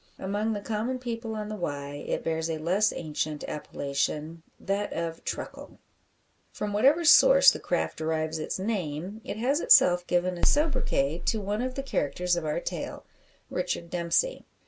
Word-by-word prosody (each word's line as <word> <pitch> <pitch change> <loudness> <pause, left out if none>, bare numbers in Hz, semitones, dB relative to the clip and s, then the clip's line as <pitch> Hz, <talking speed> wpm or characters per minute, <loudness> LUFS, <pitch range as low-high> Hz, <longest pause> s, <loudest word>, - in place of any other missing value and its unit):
Among 205 +3 -1
the 205 - -4
common 225 +5 -2
people 230 -2 -5
on 210 -1 -4
the 215 - -5
Wye 145 -6 -5
it - - -2
bears 160 0 -1
a 160 - -1
less 185 +7 +2
ancient 155 -1 -3
appellation 150 +2 -3 0.2
that 200 +1 -2
of 165 -1 -4
"truckle." - - -6 0.7
From 210 -1 -4
whatever 275 +11 +4
source - - +8
the - - -5
craft - - -2
derives 160 0 -1
its 155 - -3
name, 190 -1 -3
it - - -5
has 265 +7 +1
itself 180 - +5
given 180 0 0
a - - -8
sobriquet 255 - +1
to 220 - +2
one 205 +2 -2
of 255 0 -3
the 275 - -3
characters 180 - 0
of 170 -2 -3
our 150 +2 -1
tale - - -5 0.5
Richard 170 - -3
Dempsey. 175 - 0
185 Hz, 165 wpm, -27 LUFS, 160-225 Hz, 0.7 s, source